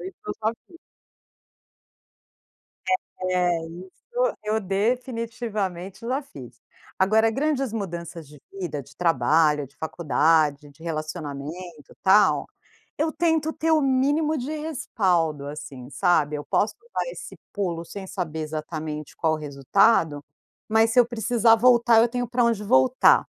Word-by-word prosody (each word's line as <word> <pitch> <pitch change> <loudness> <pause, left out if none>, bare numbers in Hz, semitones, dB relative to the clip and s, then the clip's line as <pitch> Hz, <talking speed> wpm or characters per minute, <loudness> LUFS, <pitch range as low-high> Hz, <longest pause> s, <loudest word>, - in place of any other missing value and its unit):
Isso 375 - -8
eu - - -2
já 220 - +2
fiz. 335 -2 -17 2.5
É, 180 -2 +2 0.4
isso - - -1
eu 215 +1 0
definitivamente 215 -3 -3
já 265 +3 0
fiz. 125 - -13 0.4
Agora 220 +4 +4
grandes 270 -2 -1
mudanças 170 -6 -5
de 150 0 -15
vida, 165 -7 -5
de 140 +2 -19
trabalho, 155 -3 +2
de 140 - -29
faculdade, 150 -1 +1
de 145 +3 -18
relacionamento, 155 0 -6
tal. 200 +2 +4 0.5
Eu 315 +2 0
tento 320 -1 +1
ter 325 +1 0
o 310 -1 +4
mínimo 290 +4 +2
de 265 +4 -4
respaldo, 185 - -1
assim, 135 -3 -8
sabe. 150 -1 +2
Eu 145 - -5
posso 210 - 0 0.2
dar - - -1
esse - - -9 0.2
pulo 175 -4 -2
sem 195 +1 -8
saber 160 -5 -4
exatamente 155 -1 -5
qual 160 -1 +1
o 155 - -1
resultado, 145 - +2 0.5
mas 225 +1 +4
se 245 - +4
eu 240 - +6
precisar 230 -1 +3
voltar 235 -1 +5
eu 235 - +5
tenho 245 0 -2
para 245 0 +1
onde 230 -3 +1
voltar. 130 -8 +5
190 Hz, 135 wpm, -24 LUFS, 155-240 Hz, 2.5 s, eu